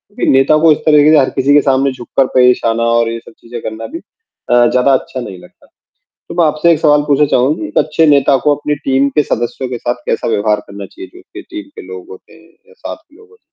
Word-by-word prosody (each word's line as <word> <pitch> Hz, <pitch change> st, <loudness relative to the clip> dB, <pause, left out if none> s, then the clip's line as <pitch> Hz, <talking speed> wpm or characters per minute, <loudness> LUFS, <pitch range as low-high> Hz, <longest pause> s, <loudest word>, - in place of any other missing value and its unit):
क्योंकि -, -, 0 dB
नेता 135 Hz, +3 st, +3 dB
को 165 Hz, -1 st, +5 dB
इस 150 Hz, -, +3 dB
तरीके 150 Hz, -1 st, +5 dB
से 155 Hz, -, +5 dB
हर 130 Hz, -, +1 dB
किसी 135 Hz, +2 st, +2 dB
के 145 Hz, -, +5 dB
सामने 135 Hz, 0 st, +1 dB
झुककर 130 Hz, +1 st, -2 dB
पेश 125 Hz, -1 st, +4 dB
आना 115 Hz, 0 st, 0 dB, 0.2 s
और 115 Hz, -, 0 dB
ये 115 Hz, -, -5 dB
सब 115 Hz, -, -17 dB
चीज़ें 120 Hz, 0 st, -9 dB
करना 110 Hz, +1 st, -7 dB
भी 330 Hz, +3 st, -8 dB
अ, 120 Hz, -, -2 dB
ज़्यादा 130 Hz, +2 st, +2 dB
अच्छा 130 Hz, 0 st, -2 dB
नहीं 95 Hz, -6 st, -9 dB
लगता। -, -, -20 dB, 0.6 s
तो -, -, -8 dB
मैं 170 Hz, -, +4 dB
आपसे 155 Hz, +3 st, +2 dB
एक 160 Hz, -, 0 dB
सवाल 150 Hz, -2 st, +3 dB
पूछना 145 Hz, +1 st, +3 dB
चाहूँगा 140 Hz, +4 st, 0 dB
कि -, -, -5 dB
एक -, -, -1 dB
अच्छे 155 Hz, +1 st, +1 dB
नेता 140 Hz, -2 st, +3 dB
को 150 Hz, -, +3 dB
अपनी 150 Hz, 0 st, -3 dB
टीम 135 Hz, +1 st, +2 dB
के 150 Hz, -, +5 dB
सदस्यों 120 Hz, +1 st, -3 dB
के 125 Hz, -, -4 dB
साथ 120 Hz, +1 st, -2 dB
कैसा -, -, -2 dB
व्यवहार 105 Hz, -1 st, 0 dB
करना 100 Hz, 0 st, -9 dB
चाहिए? 365 Hz, +2 st, -12 dB
जो -, -, -13 dB
उसके 370 Hz, 0 st, -12 dB
टीम 320 Hz, -4 st, -10 dB
के -, -, -9 dB
लोग 95 Hz, -1 st, -10 dB
होते 95 Hz, -, -14 dB
हैं 165 Hz, +1 st, -21 dB, 0.2 s
या 470 Hz, -, -20 dB
साथ -, -, -8 dB
के -, -, -26 dB
लोग 440 Hz, -, -20 dB
हो 450 Hz, -, -21 dB
तो? -, -, -42 dB
135 Hz, 260 wpm, -14 LUFS, 120-155 Hz, 0.6 s, को